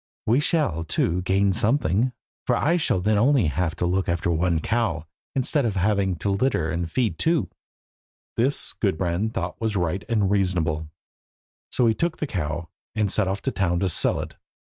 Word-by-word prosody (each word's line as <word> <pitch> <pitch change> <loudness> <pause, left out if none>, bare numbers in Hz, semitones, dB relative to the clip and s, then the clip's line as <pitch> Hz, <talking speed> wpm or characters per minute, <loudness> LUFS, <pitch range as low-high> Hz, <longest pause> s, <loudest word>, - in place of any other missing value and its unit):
We 120 +5 +3
shall, 150 - +1
too, 85 +2 0
gain 95 +1 +2
something, 115 - +2 0.4
for 125 - +3
I 160 +8 +2
shall 150 - +1
then 105 +2 +2
have 105 - +3
only 135 - +3
to 90 0 -1
look 95 +2 0
after 85 0 0
one 85 0 +1
cow, 110 -5 -1 0.3
instead 135 +2 +1
of 110 -4 -1
having 95 -1 +1
to 100 +5 -2
litter 100 -6 +1
and 85 0 -2
feed 110 -8 0
two." 160 - +1 0.8
This 130 +5 +2
Gudbrand 95 +2 -1
thought 90 +3 -4
was 110 -2 -1
right 90 0 -1
and 105 -4 +1
reasonable, 85 -6 0 0.8
so 125 - +2
he 115 - +4
took 170 +7 -1
the - - -2
cow, 85 - -3 0.3
and 105 -3 +1
set 105 -3 +1
off 95 +1 -3
to 135 - 0
town 90 -6 0
to 95 - +1
sell - - +2
it. - - -7
95 Hz, 180 wpm, -24 LUFS, 85-115 Hz, 0.8 s, he